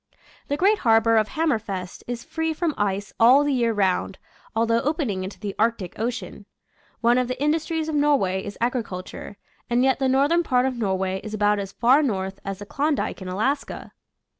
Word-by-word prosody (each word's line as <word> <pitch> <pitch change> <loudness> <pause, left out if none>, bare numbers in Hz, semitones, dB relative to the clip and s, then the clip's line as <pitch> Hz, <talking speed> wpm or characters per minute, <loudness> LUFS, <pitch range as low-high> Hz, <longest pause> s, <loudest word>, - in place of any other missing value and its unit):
The 285 - -1
great 405 +5 +3
harbor 225 0 +4
of 215 -1 +3
Hammerfest 215 - -2
is 240 -1 -4
free 320 0 -2
from 325 0 -1
ice 200 0 -2
all 250 +5 +7
the 290 -1 0
year 235 -3 +2
round, 195 -2 0 0.4
although 230 +1 +2
open 295 -4 -1
ing 185 -1 -3
into 190 +2 -7
the 205 -2 -4
Arctic 220 -5 0
Ocean. 240 +2 -4 0.5
One 240 +1 +4
of 250 - 0
the 255 - -4
indus 300 +2 +1
tries 320 -1 -2
of 315 - -3
Norway 275 -11 +2
is 205 - -7
agriculture, 220 -5 -4 0.3
and 240 +1 +2
yet 265 0 +2
the 265 -1 +1
northern 285 +6 +3
part 255 -6 +1
of 265 -1 -1
Norway 190 -4 -1
is 215 0 -5
about 205 0 +2
as 195 -1 -5
far 255 +5 +4
north 195 -8 -2
as 195 -1 -4
the 205 - -9
Klondike 285 0 -1
in 185 - -6
Alaska. 220 +10 -2
235 Hz, 190 wpm, -24 LUFS, 200-280 Hz, 0.5 s, all